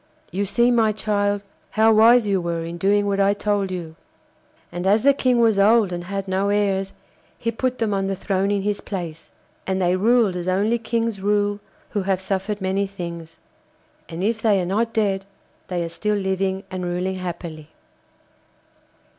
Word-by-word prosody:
You 195 Hz, +4 st, -1 dB
see, 235 Hz, +5 st, +2 dB
my 225 Hz, -3 st, +3 dB
child, 205 Hz, -1 st, -1 dB, 0.3 s
how 220 Hz, +1 st, +4 dB
wise 230 Hz, +2 st, +6 dB
you 195 Hz, -2 st, +1 dB
were 170 Hz, -1 st, -2 dB
in 170 Hz, +1 st, -6 dB
doing 205 Hz, +2 st, +2 dB
what 200 Hz, -1 st, 0 dB
I 200 Hz, +1 st, +3 dB
told 205 Hz, -2 st, 0 dB
you.' 170 Hz, -3 st, -6 dB, 0.8 s
And 175 Hz, +2 st, -3 dB
as 210 Hz, +2 st, +4 dB
the 280 Hz, +1 st, +6 dB
King 255 Hz, -3 st, +2 dB
was 225 Hz, -3 st, +3 dB
old 210 Hz, -2 st, +4 dB
and 175 Hz, 0 st, -5 dB
had 195 Hz, +1 st, -4 dB
no 190 Hz, +2 st, 0 dB
heirs, 195 Hz, -2 st, 0 dB, 0.4 s
he 230 Hz, -, -2 dB
put 255 Hz, +2 st, -2 dB
them 220 Hz, -3 st, 0 dB
on 195 Hz, -1 st, 0 dB
the 195 Hz, -, -1 dB
throne 195 Hz, +1 st, -1 dB
in 200 Hz, -1 st, 0 dB
his 205 Hz, 0 st, -1 dB
place. 170 Hz, -5 st, -6 dB, 0.4 s
And 190 Hz, 0 st, 0 dB
they 180 Hz, -1 st, +2 dB
ruled 220 Hz, 0 st, +3 dB
as 180 Hz, 0 st, -4 dB
only 205 Hz, +6 st, +1 dB
kings 230 Hz, -3 st, -2 dB
rule 205 Hz, 0 st, +1 dB, 0.3 s
who 205 Hz, -, -1 dB
have 190 Hz, -1 st, 0 dB
suffered 195 Hz, +2 st, -3 dB
many 190 Hz, +1 st, 0 dB
things. 170 Hz, -4 st, -8 dB, 0.7 s
And 170 Hz, +2 st, -5 dB
if 220 Hz, +2 st, 0 dB
they 210 Hz, -4 st, +3 dB
are 180 Hz, -, -1 dB
not 220 Hz, +6 st, 0 dB
dead 200 Hz, -4 st, 0 dB, 0.4 s
they 175 Hz, -2 st, -2 dB
are 165 Hz, -, -4 dB
still 210 Hz, +5 st, -1 dB
living 190 Hz, 0 st, -1 dB
and 185 Hz, -1 st, -4 dB
ruling 180 Hz, +2 st, -2 dB
happily. 170 Hz, -4 st, -6 dB
195 Hz, 180 wpm, -22 LUFS, 185-210 Hz, 0.8 s, wise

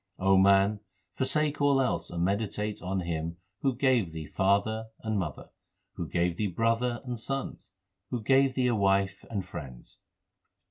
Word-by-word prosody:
O 95 Hz, 0 st, +3 dB
man, 100 Hz, +2 st, +5 dB, 0.3 s
forsake 145 Hz, +2 st, +1 dB
all 140 Hz, -1 st, +4 dB
else 130 Hz, -2 st, 0 dB
and 85 Hz, 0 st, -2 dB
meditate 105 Hz, +2 st, -1 dB
on 95 Hz, +1 st, -2 dB
Him 85 Hz, -1 st, -3 dB, 0.2 s
Who 135 Hz, -4 st, +1 dB
gave 120 Hz, -, +2 dB
thee 80 Hz, -1 st, -5 dB
father 100 Hz, +7 st, +1 dB
and 110 Hz, -2 st, -1 dB
mother, 75 Hz, -7 st, -5 dB, 0.4 s
Who 85 Hz, -4 st, -5 dB
gave 85 Hz, 0 st, 0 dB
thee 105 Hz, -, 0 dB
brother 115 Hz, +5 st, 0 dB
and 120 Hz, -2 st, -4 dB
sons, 135 Hz, -3 st, -4 dB, 0.4 s
Who 120 Hz, -3 st, -3 dB
gave 135 Hz, +2 st, +4 dB
thee 130 Hz, -, +1 dB
a 125 Hz, -, +3 dB
wife 95 Hz, -1 st, +1 dB
and 100 Hz, -4 st, -3 dB
friends. 70 Hz, -9 st, -9 dB
100 Hz, 155 wpm, -29 LUFS, 90-125 Hz, 0.4 s, man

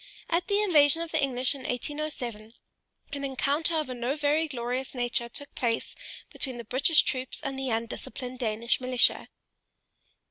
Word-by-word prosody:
At 340 Hz, +2 st, +1 dB
the 405 Hz, 0 st, +2 dB
invasion 320 Hz, -4 st, +5 dB
of 335 Hz, -, -8 dB
the 315 Hz, -, +1 dB
English 255 Hz, -1 st, +1 dB
in 275 Hz, -, -9 dB
1807, 245 Hz, -4 st, -4 dB, 0.6 s
an 280 Hz, -1 st, -4 dB
encounter 280 Hz, +4 st, +1 dB
of 310 Hz, -, -1 dB
a 255 Hz, -, -4 dB
no 245 Hz, +3 st, -2 dB
very 305 Hz, +2 st, +2 dB
glorious 255 Hz, -1 st, -3 dB
nature 240 Hz, -1 st, 0 dB
took 285 Hz, +4 st, -7 dB
place 230 Hz, -3 st, -1 dB, 0.4 s
between 260 Hz, -3 st, +1 dB
the 235 Hz, -, -6 dB
British 270 Hz, +7 st, +4 dB
troops 255 Hz, 0 st, -1 dB
and 275 Hz, -3 st, -4 dB
the 265 Hz, -1 st, -2 dB
undisciplined 235 Hz, +2 st, -4 dB
Danish 230 Hz, +1 st, 0 dB
militia. 255 Hz, -1 st, +3 dB
260 Hz, 155 wpm, -28 LUFS, 245-295 Hz, 0.6 s, invasion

